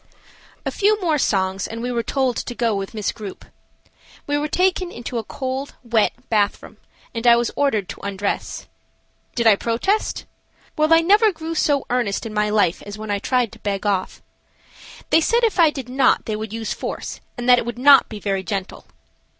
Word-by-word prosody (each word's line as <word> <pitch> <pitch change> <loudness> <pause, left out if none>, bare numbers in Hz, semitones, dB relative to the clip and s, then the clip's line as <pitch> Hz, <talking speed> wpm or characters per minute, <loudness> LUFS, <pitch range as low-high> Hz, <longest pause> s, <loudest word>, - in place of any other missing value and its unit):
A - - -1
FEW 420 +1 +2
more 325 -6 +1
songs 190 -4 0
and 225 - -7
we 245 +2 -3
were 235 -1 0
told 255 +1 0
to 245 - -4
go 235 -2 +1
with 195 +2 -4
Miss 210 -2 -1
Grupe. 205 -3 -9 0.8
We 290 - -1
were 295 +1 0
taken 365 +2 +1
into 240 0 -5
a - - -5
cold, 265 +4 -5
wet 230 -3 +2 0.2
bathroom, 210 -2 -1 0.4
and 230 0 -2
I 235 - +8
was 235 -1 0
ordered 220 -10 +1
to - - -8
undress. 200 0 -3 0.7
Did 235 - 0
I 220 -2 +7
protest? 240 - -1 0.5
Well, 310 +1 +1
I 330 0 +7
never 415 +5 +5
grew 325 -2 -6
so 290 -3 +1
earnest 235 -6 0
in 220 - -6
my 210 0 +1
life 205 -4 +2
as 205 +1 -8
when 215 -1 -5
I 200 - 0
tried 245 0 0
to - - -14
beg 200 0 -3
off. 195 -2 -1 0.9
They 325 - +5
said 470 +8 +2
if 445 -5 +1
I 330 -2 +7
did 270 -4 -6
not 260 +2 +2
they 215 - -2
would 215 -1 -5
use 225 -1 -3
force - - -5 0.2
and 245 0 -4
that 250 -1 +7
it - - -4
would 240 - -4
not 275 +2 +6
be 215 - -7
very 195 -2 -1
gentle. 190 +1 -5
235 Hz, 200 wpm, -21 LUFS, 210-290 Hz, 0.9 s, I